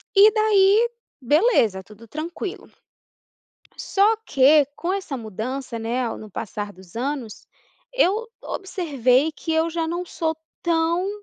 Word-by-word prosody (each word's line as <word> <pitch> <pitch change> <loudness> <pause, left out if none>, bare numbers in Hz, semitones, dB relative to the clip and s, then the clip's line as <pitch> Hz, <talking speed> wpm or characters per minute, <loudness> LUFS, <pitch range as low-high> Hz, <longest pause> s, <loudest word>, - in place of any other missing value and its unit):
E 410 +2 +8
daí 430 +1 +4 0.3
beleza, 255 - +3
tudo 215 +4 -15
tranquilo. 335 - -6 1.1
Só 415 +3 +2
que 285 0 +5
com 350 +2 -2
essa 385 -8 -3
mudança, 235 +3 -5
né, 235 +2 -1
no 215 - -10
passar 205 0 -5
dos 185 0 -16
anos, 255 -3 -4 0.5
eu 450 -2 +2 0.2
observei 295 - 0
que 325 +1 -4
eu 320 +1 +1
já 330 0 -2
não 345 +2 -3
sou 320 -2 -2 0.3
tão 335 +2 +1
315 Hz, 125 wpm, -23 LUFS, 235-380 Hz, 1.1 s, E